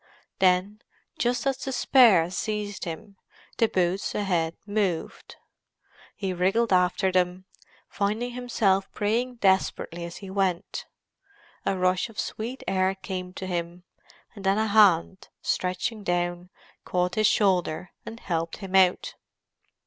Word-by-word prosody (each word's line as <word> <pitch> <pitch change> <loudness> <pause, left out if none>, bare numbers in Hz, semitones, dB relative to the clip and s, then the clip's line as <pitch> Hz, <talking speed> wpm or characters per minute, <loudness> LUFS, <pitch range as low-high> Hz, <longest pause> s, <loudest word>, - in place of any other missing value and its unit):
Then, 190 +3 +2 0.4
just 245 +2 0
as 270 -1 +1
despair 240 -9 +4
seized 205 +1 -3
him, 180 +4 -7 0.4
the 225 - +5
boots 185 -1 -1
ahead 170 -5 0
moved. 205 -5 -2 0.8
He 195 -3 -3
wriggled 195 +5 +1
after 180 +1 +2
them, 180 0 0 0.4
finding 215 +4 -2
himself 215 -6 0
praying 235 +5 -1
desperately 190 -4 0
as 170 0 -7
he 195 -2 -9
went. 190 -3 -1 0.8
A 195 - +1
rush 185 +3 +1
of 225 - -9
sweet 235 +4 -4
air 190 0 +1
came 185 -1 -6
to 190 - -6
him, 175 -1 -4 0.5
and 200 -4 -11
then 195 +1 +2
a 220 - +2
hand, 200 -4 +3
stretching 185 +4 -2
down, 175 -1 -1 0.3
caught 180 0 -1
his 215 +1 +3
shoulder, 180 -5 +1
and 230 - -9
helped 165 -2 -2
him 195 -2 -5
out. 185 -1 +3
190 Hz, 125 wpm, -26 LUFS, 180-210 Hz, 0.8 s, the